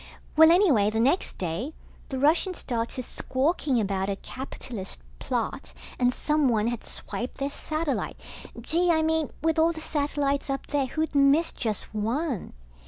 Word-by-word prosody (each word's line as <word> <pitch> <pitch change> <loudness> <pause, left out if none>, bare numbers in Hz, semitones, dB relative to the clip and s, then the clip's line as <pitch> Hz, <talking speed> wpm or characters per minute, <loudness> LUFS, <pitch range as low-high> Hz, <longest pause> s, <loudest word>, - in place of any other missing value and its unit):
Well, 320 +1 +8
anyway 325 - +5
the 220 +1 -1
next 275 +11 +2
day, 190 - -3 0.3
the 265 - -3
Russians 325 +7 +2
started 235 +1 -3
squawking 265 +1 0
about 195 -2 -1
a 200 - 0
capitalist 240 -3 -7 0.2
plot, 60 0 -3 0.3
and 245 0 +4
someone 260 -7 +2
had 240 -2 -4
swiped 245 - -4
their 275 +1 -2
satellite. 310 -1 -3 0.4
Gee, 335 +9 +1
I 320 -2 +3
mean 320 -1 +1
with 320 0 +2
all 325 +1 +5
the 320 - -7
satellites 285 -2 -1
up 275 0 -2
there, 285 -3 0
who'd 315 +4 -2
miss 285 +3 +4
just 220 -2 -3
one? 235 - -2
275 Hz, 150 wpm, -27 LUFS, 235-315 Hz, 0.4 s, Well